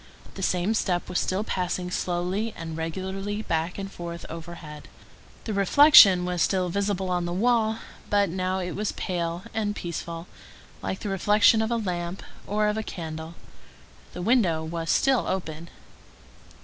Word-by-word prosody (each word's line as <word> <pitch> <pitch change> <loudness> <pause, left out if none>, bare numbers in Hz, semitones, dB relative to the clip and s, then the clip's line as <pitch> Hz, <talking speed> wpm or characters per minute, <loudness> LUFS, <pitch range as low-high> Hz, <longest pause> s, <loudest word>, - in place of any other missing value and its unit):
The 195 - -8
same 180 +3 +1
step 180 -5 0
was 180 - -1
still 190 +3 -1
passing 180 -2 -2
slowly 180 +6 -2
and 165 -1 -6
regularly 190 +6 -4
back 165 0 -1
and 195 -1 -5
forth 170 -2 -7
overhead. 165 -2 -9 0.6
The 220 - -3
reflection 200 -3 +7
was 180 -1 -1
still 185 +1 +1
visible 195 0 -1
on 175 -1 0
the 175 - -3
wall, 220 +2 +2 0.3
but 205 -1 +3
now 185 +2 -1
it 180 -1 -3
was 210 +4 -2
pale 170 -1 -3
and 210 -2 -1
peaceful, 170 -1 -5 0.6
like 190 - -4
the 205 - -3
reflection 205 +3 +4
of 220 - 0
a 235 - +1
lamp 180 -3 -3 0.2
or 210 +1 +1
of 210 +1 0
a - - 0
candle. 160 -3 -6 0.8
The 180 - -5
window 185 -8 +2
was 165 +1 -4
still 265 -3 +3
open. 170 -3 -4
185 Hz, 155 wpm, -26 LUFS, 170-205 Hz, 0.8 s, reflection